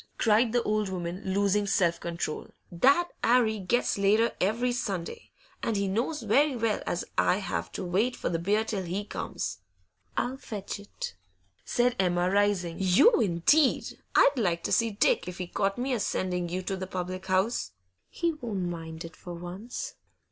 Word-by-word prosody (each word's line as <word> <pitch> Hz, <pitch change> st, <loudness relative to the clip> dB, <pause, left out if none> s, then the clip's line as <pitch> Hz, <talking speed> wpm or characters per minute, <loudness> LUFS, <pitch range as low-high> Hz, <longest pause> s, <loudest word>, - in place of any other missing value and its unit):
cried 225 Hz, +1 st, +3 dB
the 240 Hz, 0 st, +2 dB
old 210 Hz, -1 st, 0 dB
woman, 180 Hz, 0 st, -4 dB
losing 200 Hz, +1 st, +1 dB
self 170 Hz, -3 st, +2 dB
control. 170 Hz, -2 st, -4 dB, 0.2 s
'That 275 Hz, -, +4 dB
'Arry 230 Hz, -3 st, +3 dB
gets 200 Hz, +3 st, 0 dB
later 215 Hz, +4 st, +4 dB
every 230 Hz, +6 st, +1 dB
Sunday, 195 Hz, -8 st, -4 dB, 0.3 s
and 225 Hz, -, -1 dB
he 200 Hz, 0 st, 0 dB
knows 235 Hz, +9 st, -1 dB
very 270 Hz, +6 st, +3 dB
well 225 Hz, -3 st, 0 dB
as 175 Hz, -, -1 dB
I 180 Hz, -, +3 dB
have 85 Hz, -, -3 dB
to 190 Hz, -, -4 dB
wait 205 Hz, +8 st, +1 dB
for -, -, -3 dB
the 165 Hz, -, 0 dB
beer 205 Hz, +5 st, +2 dB
till 210 Hz, -3 st, -2 dB
he 185 Hz, +3 st, -3 dB
comes.' -, -, -4 dB, 0.6 s
I'll 255 Hz, +2 st, -1 dB
fetch 205 Hz, -6 st, -6 dB
it,' 485 Hz, -, -7 dB, 0.5 s
said 245 Hz, 0 st, +1 dB
Emma, 180 Hz, -1 st, +2 dB
rising. 200 Hz, -4 st, +1 dB
'You 195 Hz, -, +5 dB
indeed! 220 Hz, -, +2 dB, 0.2 s
I'd 275 Hz, -2 st, +5 dB
like 170 Hz, -6 st, 0 dB
to -, -, -2 dB
see 230 Hz, -1 st, +3 dB
Dick 205 Hz, -3 st, +2 dB
if 180 Hz, 0 st, -6 dB
he 180 Hz, -, -3 dB
caught 195 Hz, +3 st, -1 dB
me 255 Hz, +2 st, -1 dB
a 240 Hz, -, 0 dB
sending 180 Hz, -3 st, -1 dB
you 185 Hz, +2 st, -3 dB
to 195 Hz, -, -2 dB
the 185 Hz, 0 st, -5 dB
public 185 Hz, 0 st, -5 dB
house.' 190 Hz, -, +1 dB, 0.4 s
'He 340 Hz, -1 st, -1 dB
won't 215 Hz, -, -3 dB
mind 165 Hz, -1 st, -6 dB
it 165 Hz, -, -10 dB
for 175 Hz, -1 st, -8 dB
once. 190 Hz, -, -6 dB
200 Hz, 175 wpm, -28 LUFS, 180-230 Hz, 0.6 s, You